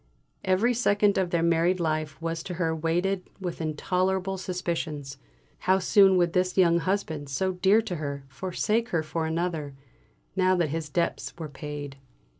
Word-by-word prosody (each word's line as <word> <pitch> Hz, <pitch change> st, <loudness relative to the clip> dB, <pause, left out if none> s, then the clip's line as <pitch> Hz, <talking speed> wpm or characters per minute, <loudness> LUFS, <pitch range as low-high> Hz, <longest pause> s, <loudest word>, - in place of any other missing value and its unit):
Every 195 Hz, +6 st, +3 dB
second 205 Hz, -4 st, +3 dB
of 185 Hz, -2 st, 0 dB
their 170 Hz, -1 st, +1 dB
married 170 Hz, +2 st, +3 dB
life 155 Hz, -2 st, -1 dB
was 165 Hz, 0 st, -3 dB
to 180 Hz, -, -4 dB
her 165 Hz, -2 st, 0 dB
weighted 175 Hz, +4 st, -1 dB
with 180 Hz, -3 st, -4 dB
intolerable 185 Hz, +4 st, 0 dB
suspicions; 170 Hz, -6 st, -4 dB, 0.4 s
how 185 Hz, +1 st, +3 dB
soon 190 Hz, 0 st, +5 dB
would 175 Hz, -1 st, +2 dB
this 180 Hz, 0 st, +1 dB
young 170 Hz, -2 st, +5 dB
husband, 160 Hz, -6 st, -2 dB
so 185 Hz, +8 st, 0 dB
dear 190 Hz, +4 st, +3 dB
to 180 Hz, -5 st, -4 dB
her, 140 Hz, -2 st, -4 dB
forsake 190 Hz, -, -1 dB
her 165 Hz, -2 st, 0 dB
for 160 Hz, +1 st, -2 dB
another, 160 Hz, -4 st, -2 dB, 0.6 s
now 185 Hz, -1 st, +3 dB
that 170 Hz, -4 st, +1 dB
his 160 Hz, 0 st, -3 dB
debts 170 Hz, +3 st, -1 dB
were 160 Hz, -2 st, -6 dB
paid? 145 Hz, -1 st, -7 dB
175 Hz, 160 wpm, -27 LUFS, 155-185 Hz, 0.6 s, soon